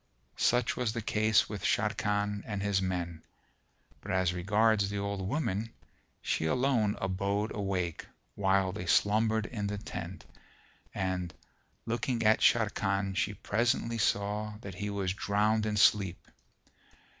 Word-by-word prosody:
Such 125 Hz, 0 st, +2 dB
was 120 Hz, -3 st, -1 dB
the 120 Hz, -, -3 dB
case 110 Hz, 0 st, +3 dB
with 105 Hz, -3 st, -6 dB
Sharrkan 105 Hz, -1 st, 0 dB
and 105 Hz, -3 st, -3 dB
his 100 Hz, -2 st, +1 dB
men; 85 Hz, -3 st, -3 dB, 0.8 s
but 100 Hz, -, -10 dB
as 95 Hz, -2 st, +1 dB
regards 105 Hz, +3 st, +2 dB
the 100 Hz, -, -3 dB
old 100 Hz, 0 st, -2 dB
woman 115 Hz, -4 st, -2 dB, 0.5 s
she -, -, 0 dB
alone 120 Hz, -, +2 dB
abode 100 Hz, +3 st, -1 dB
awake 95 Hz, -5 st, -2 dB, 0.3 s
while 95 Hz, -1 st, +2 dB
they 90 Hz, -2 st, -6 dB
slumbered 110 Hz, +3 st, +3 dB
in 105 Hz, -3 st, -3 dB
the 105 Hz, 0 st, -3 dB
tent 90 Hz, -2 st, -7 dB, 0.7 s
and, 90 Hz, -2 st, -2 dB, 0.5 s
looking 115 Hz, +1 st, -1 dB
at 110 Hz, 0 st, +5 dB
Sharrkan 100 Hz, -3 st, +2 dB
she 105 Hz, 0 st, 0 dB
presently 115 Hz, +3 st, 0 dB
saw 105 Hz, 0 st, 0 dB
that 100 Hz, -3 st, -7 dB
he 100 Hz, +3 st, -4 dB
was 100 Hz, -2 st, -1 dB
drowned 105 Hz, +2 st, +1 dB
in 105 Hz, -1 st, -1 dB
sleep. 95 Hz, -3 st, +3 dB
105 Hz, 135 wpm, -30 LUFS, 95-110 Hz, 0.8 s, at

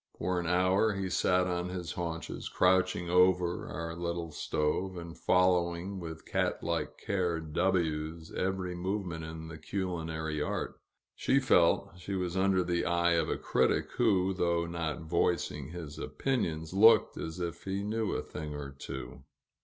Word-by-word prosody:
For 90 Hz, -1 st, 0 dB
an 85 Hz, -, -3 dB
hour, 95 Hz, +4 st, +3 dB
he 95 Hz, -1 st, -2 dB
sat 90 Hz, 0 st, +3 dB
on 90 Hz, 0 st, -1 dB
his 90 Hz, -2 st, -4 dB
haunches, 85 Hz, -2 st, -4 dB
crouching 90 Hz, -1 st, +2 dB
over 90 Hz, -1 st, +3 dB
our 85 Hz, -1 st, -5 dB
little 85 Hz, -1 st, -3 dB
stove, 90 Hz, +6 st, -1 dB
and 85 Hz, -1 st, -7 dB
following 90 Hz, +1 st, +2 dB
with 80 Hz, -2 st, -7 dB
cat -, -, -1 dB
like -, -, -2 dB
care 90 Hz, -4 st, -1 dB
W 80 Hz, -1 st, 0 dB
's 80 Hz, -, -13 dB
every 95 Hz, -1 st, -1 dB
movement 90 Hz, -2 st, -3 dB
in 80 Hz, 0 st, -7 dB
the 80 Hz, -1 st, -9 dB
culinary 80 Hz, -4 st, -3 dB
art; -, -, -3 dB, 0.3 s
she 135 Hz, -, +2 dB
felt 90 Hz, -8 st, +3 dB
she 100 Hz, +2 st, -4 dB
was 90 Hz, -1 st, -2 dB
under 95 Hz, -1 st, +3 dB
the 85 Hz, -1 st, 0 dB
eye 85 Hz, 0 st, +2 dB
of 85 Hz, -, +1 dB
a -, -, 0 dB
critic -, -, +1 dB
who, 95 Hz, -5 st, +3 dB
though 85 Hz, -2 st, +1 dB
not 85 Hz, -3 st, -3 dB
voicing 85 Hz, +1 st, 0 dB
his 80 Hz, -3 st, -7 dB
opinions, 80 Hz, -13 st, -2 dB
looked 110 Hz, +4 st, +6 dB
as 80 Hz, +2 st, -5 dB
if 85 Hz, -1 st, -4 dB
he 95 Hz, +1 st, -2 dB
knew 110 Hz, +1 st, -1 dB
a -, -, -2 dB
thing 75 Hz, -1 st, -6 dB
or 70 Hz, -1 st, -6 dB
two. 65 Hz, -2 st, -7 dB
85 Hz, 160 wpm, -31 LUFS, 80-95 Hz, 0.3 s, looked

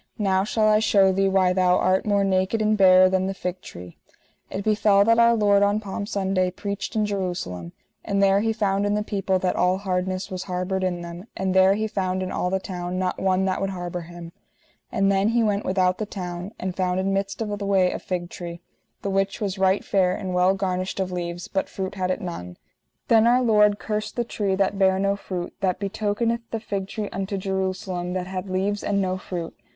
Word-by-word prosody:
Now 190 Hz, -3 st, +2 dB
shall 215 Hz, +1 st, +1 dB
I 215 Hz, 0 st, +5 dB
shew 195 Hz, -3 st, +4 dB
thee 195 Hz, +1 st, +2 dB
why 190 Hz, -1 st, +3 dB
thou 180 Hz, -1 st, +3 dB
art 185 Hz, +3 st, +1 dB
more 200 Hz, -1 st, +3 dB
naked 190 Hz, +3 st, +1 dB
and 215 Hz, 0 st, +2 dB
barer 185 Hz, -2 st, +7 dB
than 190 Hz, 0 st, +1 dB
the 195 Hz, -, -3 dB
fig 180 Hz, 0 st, -4 dB
tree. 90 Hz, -, -11 dB, 0.5 s
It 195 Hz, -, -4 dB
befell 205 Hz, -1 st, +4 dB
that 230 Hz, +1 st, +4 dB
Our 235 Hz, 0 st, +5 dB
Lord 205 Hz, -2 st, +3 dB
on 205 Hz, +1 st, +3 dB
Palm 205 Hz, 0 st, -5 dB
Sunday 190 Hz, -2 st, 0 dB
preached 200 Hz, +3 st, -5 dB
in 215 Hz, -1 st, +2 dB
Jerusalem, 175 Hz, -, -4 dB, 0.3 s
and 200 Hz, -, -2 dB
there 195 Hz, 0 st, +4 dB
He 225 Hz, +2 st, +1 dB
found 205 Hz, -2 st, 0 dB
in 205 Hz, -, +1 dB
the 210 Hz, -, 0 dB
people 195 Hz, -2 st, 0 dB
that 185 Hz, 0 st, -1 dB
all 180 Hz, +1 st, +2 dB
hardness 185 Hz, -1 st, -2 dB
was 185 Hz, 0 st, -4 dB
harboured 185 Hz, +1 st, -2 dB
in 180 Hz, -2 st, -1 dB
them, 175 Hz, +4 st, -8 dB
and 190 Hz, -1 st, -1 dB
there 190 Hz, +1 st, +5 dB
He 215 Hz, +1 st, -1 dB
found 190 Hz, -3 st, -2 dB
in 185 Hz, -, -4 dB
all 180 Hz, -, -1 dB
the 190 Hz, +1 st, 0 dB
town 180 Hz, -1 st, -5 dB
not 185 Hz, 0 st, -2 dB
one 190 Hz, 0 st, +2 dB
that 190 Hz, -1 st, -1 dB
would 195 Hz, -, 0 dB
harbour 175 Hz, -2 st, -5 dB
him. 170 Hz, 0 st, -10 dB, 0.6 s
And 195 Hz, 0 st, +2 dB
then 195 Hz, +1 st, +2 dB
He 235 Hz, 0 st, +2 dB
went 205 Hz, -1 st, 0 dB
without 185 Hz, -1 st, +1 dB
the 215 Hz, -, -3 dB
town, 180 Hz, -1 st, -6 dB
and 185 Hz, -1 st, -3 dB
found 185 Hz, -1 st, 0 dB
in 195 Hz, +1 st, 0 dB
midst 195 Hz, 0 st, -2 dB
of 210 Hz, -2 st, -2 dB
the 200 Hz, -, -3 dB
way 190 Hz, -2 st, +3 dB
a -, -, -4 dB
fig 175 Hz, -2 st, -4 dB
tree, 170 Hz, -1 st, -7 dB, 0.4 s
the 200 Hz, -, -1 dB
which 195 Hz, 0 st, 0 dB
was 200 Hz, -2 st, -3 dB
right 190 Hz, +1 st, +2 dB
fair 185 Hz, -2 st, +2 dB
and 190 Hz, -3 st, -4 dB
well 180 Hz, +2 st, +3 dB
garnished 185 Hz, -1 st, -2 dB
of 185 Hz, -1 st, -1 dB
leaves, 175 Hz, 0 st, -4 dB
but 190 Hz, -, -2 dB
fruit 190 Hz, -1 st, -4 dB
had 185 Hz, -2 st, -2 dB
it 185 Hz, -, -1 dB
none. 90 Hz, -, -6 dB, 0.5 s
Then 225 Hz, 0 st, +5 dB
Our 250 Hz, +2 st, +4 dB
Lord 210 Hz, -3 st, +4 dB
cursed 215 Hz, 0 st, -4 dB
the 240 Hz, -, 0 dB
tree 205 Hz, -4 st, -1 dB
that 195 Hz, +1 st, 0 dB
bare 190 Hz, -1 st, +4 dB
no 200 Hz, +1 st, +1 dB
fruit; 180 Hz, -3 st, -5 dB
that 185 Hz, -2 st, +1 dB
betokeneth 215 Hz, +3 st, -1 dB
the 225 Hz, -, -3 dB
fig 200 Hz, -3 st, -4 dB
tree 210 Hz, 0 st, -4 dB
unto 195 Hz, +1 st, -3 dB
Jerusalem, 185 Hz, -2 st, -3 dB
that 185 Hz, -1 st, -2 dB
had 185 Hz, +1 st, -5 dB
leaves 195 Hz, +2 st, -1 dB
and 200 Hz, -1 st, 0 dB
no 185 Hz, -1 st, -1 dB
fruit. 175 Hz, -3 st, -6 dB
190 Hz, 220 wpm, -24 LUFS, 185-205 Hz, 0.6 s, barer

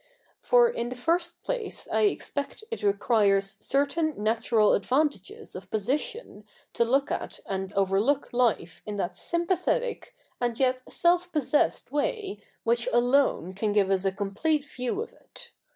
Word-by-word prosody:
For 485 Hz, -1 st, +5 dB
in 240 Hz, -, -3 dB
the 250 Hz, -, -6 dB
first 340 Hz, +6 st, 0 dB
place -, -, -3 dB
I 220 Hz, 0 st, +3 dB
expect 280 Hz, -, -2 dB
it 460 Hz, -, -4 dB
requires 200 Hz, -1 st, +2 dB
certain 285 Hz, +3 st, +1 dB
natural 220 Hz, 0 st, +2 dB
advantages 260 Hz, -, -1 dB
of 185 Hz, 0 st, -9 dB
position 250 Hz, -, -3 dB, 0.3 s
to -, -, +2 dB
look 270 Hz, +4 st, +1 dB
at -, -, -3 dB
and 190 Hz, -1 st, -3 dB
overlook 200 Hz, +10 st, +1 dB
life 230 Hz, -9 st, 0 dB
in 210 Hz, -1 st, -4 dB
that 175 Hz, -, -2 dB
sympathetic 365 Hz, +8 st, -1 dB, 0.2 s
and 240 Hz, -2 st, -1 dB
yet 255 Hz, -1 st, +2 dB
self 355 Hz, +1 st, +2 dB
possessed 295 Hz, -4 st, +1 dB
way 345 Hz, -, -2 dB, 0.2 s
which 235 Hz, +1 st, +1 dB
alone 245 Hz, -7 st, +2 dB
can 205 Hz, +2 st, -1 dB
give 200 Hz, -2 st, +3 dB
us 190 Hz, -1 st, +2 dB
a 195 Hz, -, +1 dB
complete 215 Hz, +11 st, -1 dB
view 255 Hz, -, -3 dB
of -, -, -13 dB
it. -, -, -13 dB
245 Hz, 145 wpm, -27 LUFS, 205-315 Hz, 0.3 s, For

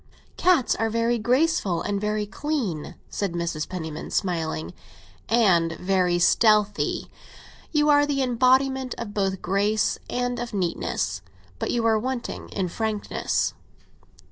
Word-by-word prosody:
"Cats 345 Hz, -8 st, +3 dB
are 225 Hz, 0 st, 0 dB
very 230 Hz, +1 st, +1 dB
graceful, 240 Hz, -, +1 dB
and 200 Hz, -1 st, -2 dB
very 210 Hz, 0 st, -1 dB
clean," 210 Hz, -, -3 dB
said 200 Hz, -4 st, -3 dB
Mrs. 170 Hz, -3 st, -3 dB
Penniman, 160 Hz, -4 st, -5 dB
smiling. 160 Hz, -, -2 dB, 0.6 s
"And 180 Hz, -8 st, +3 dB
very 180 Hz, -1 st, +1 dB
stealthy. 210 Hz, +3 st, +3 dB, 0.6 s
You 300 Hz, -1 st, +2 dB
are 290 Hz, 0 st, +5 dB
the 275 Hz, -2 st, +1 dB
embodiment 260 Hz, +1 st, +2 dB, 0.2 s
both 195 Hz, -2 st, +1 dB
of 190 Hz, -, -8 dB
grace 205 Hz, +3 st, +1 dB
and 245 Hz, 0 st, -1 dB
of 235 Hz, -2 st, -5 dB
neatness; 180 Hz, -, -1 dB, 0.4 s
but -, -, -2 dB
you 235 Hz, -1 st, 0 dB
are 220 Hz, -1 st, +4 dB
wanting 255 Hz, +1 st, -4 dB
in 190 Hz, -2 st, -2 dB
frankness." 215 Hz, +3 st, -1 dB
215 Hz, 125 wpm, -25 LUFS, 180-245 Hz, 0.6 s, are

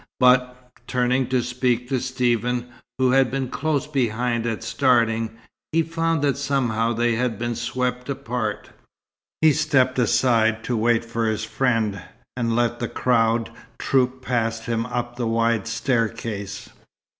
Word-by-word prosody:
But, 125 Hz, 0 st, +3 dB, 0.2 s
turning 125 Hz, +1 st, +1 dB
to 130 Hz, -1 st, +1 dB
speak 125 Hz, 0 st, 0 dB
to 130 Hz, -, +1 dB
Stephen, 125 Hz, -1 st, -1 dB, 0.3 s
who 130 Hz, -1 st, +3 dB
had 135 Hz, -1 st, +4 dB
been 135 Hz, -1 st, -2 dB
close 150 Hz, 0 st, -1 dB
behind 120 Hz, -4 st, -1 dB
at 115 Hz, -2 st, -3 dB
starting, 115 Hz, -4 st, +1 dB, 0.3 s
he 165 Hz, +1 st, +2 dB
found 165 Hz, -1 st, -1 dB
that 140 Hz, -1 st, +1 dB
somehow 120 Hz, -5 st, 0 dB
they 120 Hz, +1 st, +1 dB
had 120 Hz, -1 st, -1 dB
been 120 Hz, +1 st, -2 dB
swept 125 Hz, +2 st, -3 dB
apart. 115 Hz, -5 st, -3 dB, 0.7 s
He 155 Hz, -1 st, +6 dB
stepped 135 Hz, -4 st, +2 dB
aside 115 Hz, -2 st, +2 dB
to 125 Hz, -, -1 dB
wait 115 Hz, +1 st, +2 dB
for 115 Hz, -1 st, -1 dB
his 110 Hz, 0 st, -1 dB
friend, 110 Hz, -5 st, 0 dB, 0.3 s
and 115 Hz, -2 st, 0 dB
let 120 Hz, 0 st, +1 dB
the 120 Hz, -, -2 dB
crowd 115 Hz, -2 st, +1 dB, 0.3 s
troop 130 Hz, -1 st, 0 dB
past 115 Hz, -3 st, -1 dB
him 115 Hz, -1 st, -1 dB
up 120 Hz, 0 st, -4 dB
the 120 Hz, -2 st, -1 dB
wide 115 Hz, -1 st, +1 dB
staircase. 115 Hz, -4 st, -2 dB
120 Hz, 145 wpm, -23 LUFS, 115-130 Hz, 0.7 s, He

